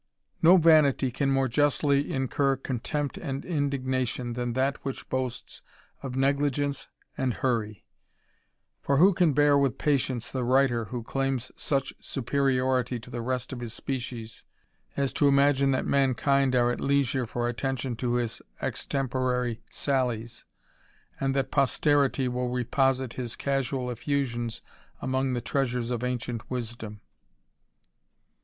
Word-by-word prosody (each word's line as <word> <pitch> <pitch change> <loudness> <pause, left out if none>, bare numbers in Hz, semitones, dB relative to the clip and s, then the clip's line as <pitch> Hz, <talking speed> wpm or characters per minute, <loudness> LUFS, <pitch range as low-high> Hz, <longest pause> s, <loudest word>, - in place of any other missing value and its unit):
No 175 +2 +8
vanity 155 -6 +5
can 135 +3 0
more 135 -1 +2
justly 145 +2 +2
incur 135 +1 +1
contempt 135 +2 -3
and 135 -4 -4
indignatio^^ 130 -6 -1
than 120 0 -2
that 135 +2 0
which 135 -1 -5
boasts 130 -2 -3 0.4
of 130 -2 -5
negligence 140 +1 0 0.3
and 130 -3 -1
hurry. 110 -5 -1 1.0
For 140 - +1
wb^^ 185 +5 +6
can 175 -5 +3
bear 145 0 +4
with 135 -5 +1
patience 130 -5 0
the 130 -2 -2
writer 125 -2 +3
who 120 +2 -5
claims 135 0 -2
such 140 -2 -1
superiorit 130 -2 0
to 125 +2 -13
the 120 -1 -4
rest 125 +2 -3
of 125 - -6
his 120 -1 -5
species, 120 -4 -5 0.5
as 140 -1 0
to 145 - +3
imagine 140 0 +4
that 130 - +1
mankind 135 0 +2
are 120 0 +3
leisure 135 -3 +1
for 120 +2 -2
attention 125 +1 -2
to 120 0 -1
his 120 -2 -2 0.2
extemporary 125 -3 -1
sallies, 120 -4 -2 0.7
and 135 0 0
tl 135 -1 0
posterity 140 -1 +2
will 125 0 -1
reposite 130 +1 +1
his 120 -3 -4
casual 135 -2 -1
eflusions 120 -2 -2 0.4
among 130 -1 0
treasures 125 -2 -1
of 120 0 -2
ancient 125 -2 -3
wisdom 115 -4 -5
130 Hz, 130 wpm, -27 LUFS, 120-140 Hz, 1.0 s, No